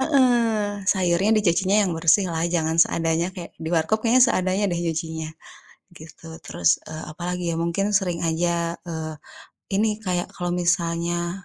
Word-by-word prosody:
heeh, 270 -2 +4 0.6
sayurnya 185 +1 +1
dicucinya 195 0 +2
yang 185 - -1
bersih 170 +4 +3
lah 160 0 -2
jangan 160 -2 0
seadanya, 165 0 +2
kayak 175 - -7
di 160 - -4
warkop 165 +7 +1
kayaknya 245 +2 +5
seadanya 185 +2 0
deh 170 -1 -2
nyucinya, 160 -1 -3 0.7
gitu. 160 +1 -14 0.2
Terus, 85 +1 +2
eee, 155 0 -7
apalagi 180 +2 -4
ya - - -2
mungkin 195 +4 0
sering 185 -4 +1
aja, 170 +1 -1
eee, 160 -1 -4 0.6
ini 215 +3 +2 0.2
kayak 180 -2 -2
kalau 175 0 -3
misalnya 175 +1 -1
170 Hz, 145 wpm, -23 LUFS, 165-185 Hz, 0.7 s, kayaknya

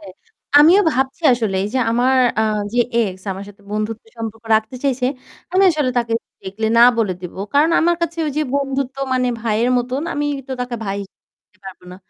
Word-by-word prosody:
হ্যাঁ, 195 -3 -11 0.5
আমিও 335 +7 +7
ভাবছি 265 +4 -2
আসলে 225 -5 -1
এই - - -2
যে 260 - +2
আমার 250 +3 +2 0.2
আ - - +3 0.3
যে 245 - -1 0.2
এক্স 190 -5 -1
আমার 195 +1 -7
সাথে 205 0 -16
বন্ধুত্বের 215 +1 -4
সম্পর্ক 225 0 -6
রাখতে 220 +3 -4
চাইছে, 260 -2 +1 0.5
আমি 375 +1 +4
আসলে 300 -5 0
তাকে 235 -1 -2 0.3
ডিরেক্টি 215 +3 -4
না - - +8
বলে 220 -5 +1
দিব। 180 -2 -8 0.2
কারণ 300 +3 +4
আমার 345 +1 +2
কাছে 335 0 -2
ওই 295 - -2
যে - - +2
বন্ধুত্ব 275 -1 -2 0.2
মানে 255 -1 +1
ভাইয়ের 230 +2 0
মতন 250 +3 -2
আমি 290 - -2 0.2
তো - - -3
তাকে 250 -1 -3
ভাই 195 -1 -3
হিসেবে 195 - -19
নিতে - - -34
পারব 190 -1 -9
না। - - -10
240 Hz, 200 wpm, -19 LUFS, 215-270 Hz, 0.5 s, না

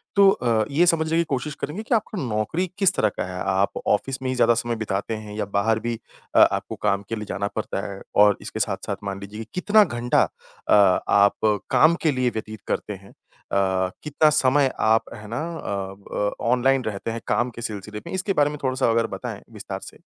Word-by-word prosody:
तो 200 -1 +7
अ, 115 - +1
ये 170 +5 +4
समझने 160 -1 +2
की 170 - +3
कोशिश 140 +3 -2
करेंगे 175 +10 -4
कि 235 - +1
आपको 215 -1 -2
नौकरी 115 - -1
किस 195 -1 +4
तरह 110 - +2
का - - -1
है? 90 0 -6
आप 95 +1 +1 0.2
ऑफ़िस 130 +6 0
में 130 - -1
ही 130 - -1
ज़्यादा 120 -1 +4
समय 120 0 -1
बिताते 110 0 -3
हैं 105 -1 -8
या 105 - -1
बाहर 110 +2 +2
भी 115 -1 -3 0.4
अ, - - +7
आपको - - +3
काम 100 +1 +1
के 115 - -1
लिए 105 -1 -5
जाना 100 +1 -2
पड़ता 105 -2 -2
है? 100 0 -8
और 105 -1 +6
इसके - - -6
साथ-साथ - - -2
मान 100 0 -4
लीजिए 105 +2 -7
कितना 210 +3 +5
घंटा 120 -6 +1 0.5
अ, - - +5 0.4
आप 100 0 +5 0.4
काम 165 +2 +5
के 155 - +4
लिए 130 -2 +1
व्यतीत 110 -1 -6
करते 105 - -2
हैं? 95 +1 -13
अ, - - -11 0.5
कितना 150 +1 +3
समय 135 0 +3
आप 110 +1 +2
है 105 0 -10
ना 115 +6 -3 0.2
अ, 95 -5 -4 0.2
ब 105 0 -1 0.2
ऑनलाइन 130 +1 +3
रहते 110 +1 -3
हैं 115 - -5
काम 120 +1 +1
के - - -5
सिलसिले 105 -1 -6
में? - - -6
इसके 190 +1 -1
बारे 145 -2 +3
में 150 - -6
थोड़ा-सा 130 -2 +1
अगर 115 0 +2
बताएँ - - -7
विस्तार - - -6
से। - - -21
115 Hz, 210 wpm, -23 LUFS, 105-145 Hz, 0.5 s, तो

